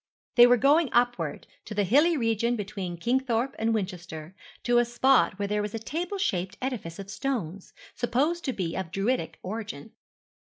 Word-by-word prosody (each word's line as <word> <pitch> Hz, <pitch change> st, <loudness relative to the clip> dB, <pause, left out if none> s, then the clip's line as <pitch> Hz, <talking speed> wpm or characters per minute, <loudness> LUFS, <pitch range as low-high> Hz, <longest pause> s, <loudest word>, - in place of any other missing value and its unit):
They 240 Hz, 0 st, +8 dB
were 245 Hz, 0 st, +5 dB
going 285 Hz, +4 st, +4 dB
upward, 240 Hz, -11 st, +1 dB, 0.2 s
to 215 Hz, -, -7 dB
the 205 Hz, -, +2 dB
hilly 295 Hz, -, +4 dB
region 230 Hz, 0 st, +1 dB
between 195 Hz, -4 st, -5 dB
Kingthorpe 245 Hz, +4 st, 0 dB
and 225 Hz, +1 st, +1 dB
Winchester, 180 Hz, -6 st, -4 dB, 0.3 s
to 240 Hz, 0 st, +4 dB
a -, -, +4 dB
spot 240 Hz, -3 st, +3 dB
where 200 Hz, 0 st, -2 dB
there 210 Hz, +1 st, 0 dB
was 210 Hz, +1 st, -4 dB
a -, -, -1 dB
table 340 Hz, -, -4 dB
shaped 190 Hz, -, -1 dB
edifice 235 Hz, -11 st, -4 dB
of 195 Hz, -, -7 dB
stones, 200 Hz, -, -4 dB, 0.2 s
supposed 290 Hz, +9 st, 0 dB
to 265 Hz, -, 0 dB
be 175 Hz, -6 st, -3 dB
of 190 Hz, -3 st, -3 dB
Druidic 195 Hz, -3 st, -1 dB
origin. 195 Hz, -8 st, -6 dB
225 Hz, 170 wpm, -27 LUFS, 190-255 Hz, 0.3 s, They